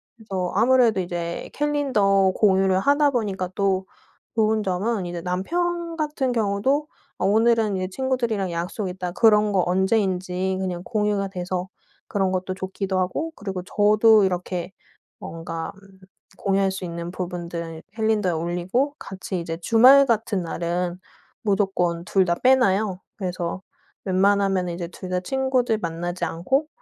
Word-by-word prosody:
그래서 190 -5 -4
아무래도 235 -1 +4
이제 170 -1 -4
캘린더 225 -10 +2
공유를 190 -2 +3
하다 285 +5 +3
보니까 200 -7 -2
또 195 -1 +1 0.5
좋은 220 -1 +2
점은 195 +2 -1
이제 175 -1 -5
남편 335 - -2
같은 295 -4 -1
경우도 230 +7 +1 0.3
어 - - 0
오늘은 220 0 +3
이제 185 0 -2
친구들이랑 235 -5 -1
약속 180 +4 -3
있다 180 -1 -4
그런 210 +1 +4
거 185 - +3
언제인지 190 -1 0
그냥 180 -2 -3
공유가 210 -3 0
돼서 180 0 -3 0.4
그런 190 -2 0
것도 185 0 -2
좋기도 190 0 -3
하고 290 - -2
그리고 195 -3 -5
저도 215 +2 +4
이렇게 180 -1 -3 0.5
뭔가 165 0 -6
음 195 -1 -19 0.4
공유할 195 -1 +1
수 190 0 -6
있는 170 0 -5
부분들은 170 -3 -5
캘린더에 220 -4 +1
올리고 175 - -1
같이 190 -1 -5
이제 165 -1 -4
주말 250 +9 +6
같은 220 -5 0
날은 175 +1 -2 0.4
무조건 190 -5 0
2 190 0 +2
다 170 -1 +1
빼놔요. 210 -7 +3 0.2
그래서 180 -2 -3 0.4
웬만하면은 195 -1 +2
이제 170 0 -5
2 185 +1 -9
다 180 0 0
친구들 255 +1 0
만나지 175 +1 -4
않고 265 - 0
195 Hz, 305 characters per minute, -23 LUFS, 180-220 Hz, 0.5 s, 주말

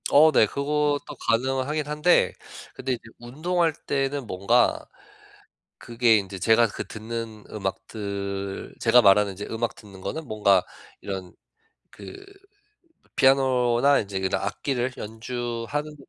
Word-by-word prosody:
어 155 +2 +7
네. 110 - +5
그것도 145 +3 0 0.2
가능하긴 135 +5 0
한데 150 +4 +3 0.4
근데 130 - -3
이제 120 - -5 0.2
운동할 160 +8 0
때는 135 -1 -1
뭔가 100 -2 +2 1.0
그게 115 -1 +3
인제 95 -1 -5
제가 115 +4 +4
그 - - -6
듣는 110 -1 -6
음악들 100 -1 -5
제가 120 +1 +5
말하는 100 0 +5
인제 100 +2 -7
음악 115 +1 -2
듣는 100 -3 -14
거는 150 +12 -5
뭔가 100 -4 +3 0.4
이런 95 -2 -6 0.6
그 390 0 -11 0.9
피아노나 130 0 +4
인제 100 -2 -4
그런 95 0 -1
악기를 130 -2 -2
연주하는 120 +6 -4
120 Hz, 250 characters per minute, -25 LUFS, 100-140 Hz, 1.0 s, 어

